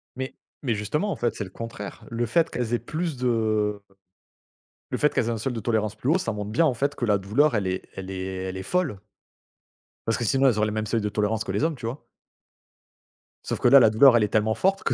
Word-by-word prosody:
Mais 130 Hz, +1 st, -5 dB, 0.3 s
mais 125 Hz, -4 st, +1 dB
justement 150 Hz, -, -1 dB
en -, -, -2 dB
fait 120 Hz, -1 st, -1 dB
c'est -, -, -3 dB
le 95 Hz, -, -8 dB
contraire. 105 Hz, 0 st, -8 dB
Le 115 Hz, 0 st, -1 dB
fait 165 Hz, +9 st, +2 dB
qu'elles 120 Hz, -1 st, -3 dB
aient 120 Hz, -, +2 dB
plus 160 Hz, -2 st, -3 dB
de 110 Hz, -4 st, 0 dB, 1.1 s
le -, -, -1 dB
fait 150 Hz, -, +2 dB
qu'elles -, -, +1 dB
aient -, -, -1 dB
un 115 Hz, -, -1 dB
seuil 125 Hz, +4 st, -2 dB
de 115 Hz, -, -3 dB
tolérance 110 Hz, -2 st, -1 dB
plus 120 Hz, +5 st, -2 dB
haut, 165 Hz, -, +4 dB
ça 150 Hz, -11 st, -2 dB
montre 105 Hz, -1 st, -5 dB
bien 160 Hz, +9 st, +3 dB
en 145 Hz, -, +2 dB
fait 140 Hz, +4 st, -1 dB
que 120 Hz, -, -2 dB
la 105 Hz, -3 st, +3 dB
douleur 115 Hz, +10 st, +2 dB
elle 100 Hz, -2 st, 0 dB
est 95 Hz, 0 st, -2 dB
elle 95 Hz, 0 st, -6 dB
est 95 Hz, -1 st, -4 dB, 0.2 s
elle 95 Hz, 0 st, -4 dB
est 95 Hz, -, -5 dB
folle. 165 Hz, -, -1 dB, 1.1 s
Parce 115 Hz, -, +1 dB
que -, -, -3 dB
sinon 135 Hz, +5 st, +3 dB
elles 120 Hz, -5 st, +3 dB
auraient 105 Hz, 0 st, +2 dB
les -, -, -2 dB
mêmes 110 Hz, 0 st, -2 dB
seuils 115 Hz, 0 st, 0 dB
de 105 Hz, -, -1 dB
tolérance 105 Hz, +1 st, 0 dB
que -, -, -4 dB
les -, -, -1 dB
hommes, 160 Hz, -1 st, +1 dB
tu 120 Hz, -3 st, -9 dB
vois? 125 Hz, +5 st, -6 dB, 1.4 s
Sauf -, -, -2 dB
que -, -, +3 dB
là, 140 Hz, -, +9 dB
la 115 Hz, -4 st, +5 dB
douleur 120 Hz, +3 st, +7 dB
elle 110 Hz, -, +3 dB
est -, -, +2 dB
tellement 110 Hz, +1 st, +1 dB
forte 195 Hz, +1 st, +1 dB
que -, -, +1 dB
115 Hz, 255 wpm, -25 LUFS, 105-135 Hz, 1.4 s, là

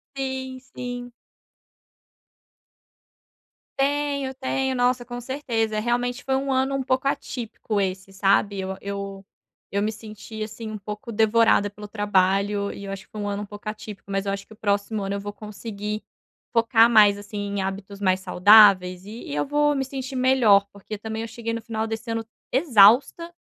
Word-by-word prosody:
Sim, 260 Hz, -1 st, -4 dB
sim. 245 Hz, -1 st, -7 dB, 2.7 s
Tenho, 280 Hz, -1 st, 0 dB
tenho. 265 Hz, 0 st, -1 dB
Nossa, 245 Hz, 0 st, +1 dB
com 245 Hz, 0 st, -6 dB
certeza, 230 Hz, -5 st, -1 dB
realmente 245 Hz, +3 st, -1 dB
foi 265 Hz, -1 st, 0 dB
um 270 Hz, 0 st, -1 dB
ano 265 Hz, +1 st, +1 dB
um 270 Hz, -, -1 dB
pouco 255 Hz, +1 st, 0 dB
atípico 225 Hz, -5 st, -3 dB
esse, 190 Hz, 0 st, -2 dB
sabe. 195 Hz, +1 st, +2 dB
Eu 190 Hz, 0 st, -4 dB
eu 200 Hz, -1 st, -6 dB, 0.5 s
eu 200 Hz, +1 st, 0 dB
me 215 Hz, -, 0 dB
senti, 215 Hz, 0 st, -9 dB
assim, 220 Hz, +1 st, -7 dB
um 210 Hz, -, -6 dB
pouco 210 Hz, +3 st, -7 dB
devorada 220 Hz, -1 st, +3 dB
pelo 210 Hz, +1 st, -10 dB
trabalho 200 Hz, 0 st, +1 dB
e 200 Hz, -, -8 dB
eu 195 Hz, -, -5 dB
acho 195 Hz, 0 st, -7 dB
que -, -, -38 dB
foi 215 Hz, -, -6 dB
um 205 Hz, -, -2 dB
ano 200 Hz, +1 st, -3 dB
um -, -, -6 dB
pouco 205 Hz, +1 st, -8 dB
atípico, 210 Hz, -2 st, -9 dB
mas 195 Hz, 0 st, -1 dB
eu 195 Hz, -, 0 dB
acho 195 Hz, 0 st, -5 dB
que -, -, -14 dB
o -, -, -16 dB
próximo 205 Hz, 0 st, -1 dB
ano 195 Hz, +1 st, -2 dB
eu 200 Hz, -, -2 dB
vou 205 Hz, +1 st, -5 dB
conseguir 210 Hz, 0 st, -6 dB, 0.5 s
focar 230 Hz, 0 st, +5 dB
mais, 205 Hz, -3 st, +6 dB
assim, 205 Hz, +1 st, -8 dB
em 200 Hz, -1 st, -2 dB
hábitos 195 Hz, +1 st, -5 dB
mais 185 Hz, -1 st, +2 dB
saudáveis 185 Hz, -2 st, +6 dB
e 220 Hz, +3 st, -8 dB
e 145 Hz, -, -3 dB
eu 145 Hz, -, 0 dB
vou 295 Hz, +1 st, +2 dB
me 270 Hz, -1 st, -1 dB
sentir 270 Hz, 0 st, -6 dB
melhor, 250 Hz, -6 st, +5 dB
porque 205 Hz, +1 st, -7 dB
também 220 Hz, +1 st, -5 dB
eu 230 Hz, -, -4 dB
cheguei 230 Hz, +1 st, -5 dB
no 230 Hz, -, -3 dB
final 220 Hz, -1 st, -3 dB
desse 225 Hz, +1 st, -5 dB
ano 225 Hz, 0 st, -2 dB, 0.3 s
exausta. 260 Hz, -, +5 dB
215 Hz, 180 wpm, -24 LUFS, 200-245 Hz, 2.7 s, mais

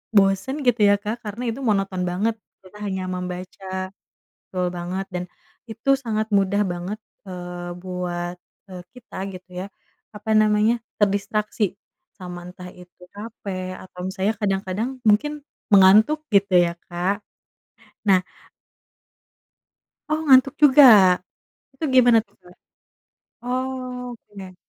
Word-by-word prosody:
bosen 200 Hz, +9 st, +2 dB
gitu 245 Hz, -2 st, +2 dB
ya 200 Hz, -, +6 dB
Kak 215 Hz, +3 st, -4 dB
karena 210 Hz, +4 st, -5 dB
itu 235 Hz, -, -7 dB
monoton 195 Hz, -4 st, 0 dB
banget, 200 Hz, +6 st, 0 dB, 0.3 s
kita 190 Hz, +2 st, -15 dB
hanya 190 Hz, -3 st, -3 dB
membaca 185 Hz, +1 st, -5 dB, 0.6 s
betul 180 Hz, -1 st, -1 dB
banget 180 Hz, +2 st, -4 dB
dan, 180 Hz, 0 st, -3 dB, 0.4 s
itu 225 Hz, +5 st, -2 dB
sangat 220 Hz, -1 st, -1 dB
mudah 200 Hz, +1 st, +3 dB
banget, 180 Hz, +3 st, -4 dB, 0.3 s
eee, 175 Hz, -1 st, -6 dB
buat, 180 Hz, -1 st, -4 dB, 0.4 s
eee, 180 Hz, -1 st, -8 dB
kita 250 Hz, -1 st, -13 dB, 0.2 s
gitu 185 Hz, 0 st, -11 dB, 0.2 s
ya, -, -, -6 dB, 0.5 s
apa 210 Hz, +1 st, -6 dB
namanya, 215 Hz, +2 st, +3 dB, 0.2 s
terdistraksi, 205 Hz, 0 st, 0 dB, 0.4 s
sama 180 Hz, -2 st, -8 dB
entah 180 Hz, 0 st, -10 dB
itu 180 Hz, 0 st, -17 dB
capek 200 Hz, -3 st, -6 dB
atau 180 Hz, -1 st, -12 dB
misalnya 190 Hz, +2 st, -1 dB
kadang-kadang, 195 Hz, +2 st, -1 dB, 0.2 s
mungkin, 215 Hz, +9 st, +3 dB, 0.4 s
mengantuk 215 Hz, +11 st, +6 dB
gitu 200 Hz, -1 st, +3 dB
ya 175 Hz, -1 st, +4 dB, 0.2 s
Kak? 185 Hz, +4 st, -1 dB, 0.8 s
Nah 195 Hz, -3 st, +5 dB, 1.9 s
Oh, 310 Hz, -, +1 dB
ngantuk 265 Hz, 0 st, +6 dB
juga? 290 Hz, 0 st, +8 dB, 0.9 s
Itu 270 Hz, -, -9 dB
gimana 245 Hz, -3 st, +7 dB
tuh 200 Hz, -, -32 dB
Kak? 180 Hz, 0 st, -17 dB, 0.9 s
Oh, 255 Hz, +1 st, -2 dB, 0.3 s
oke. 195 Hz, -5 st, -12 dB
195 Hz, 120 wpm, -23 LUFS, 180-220 Hz, 1.9 s, juga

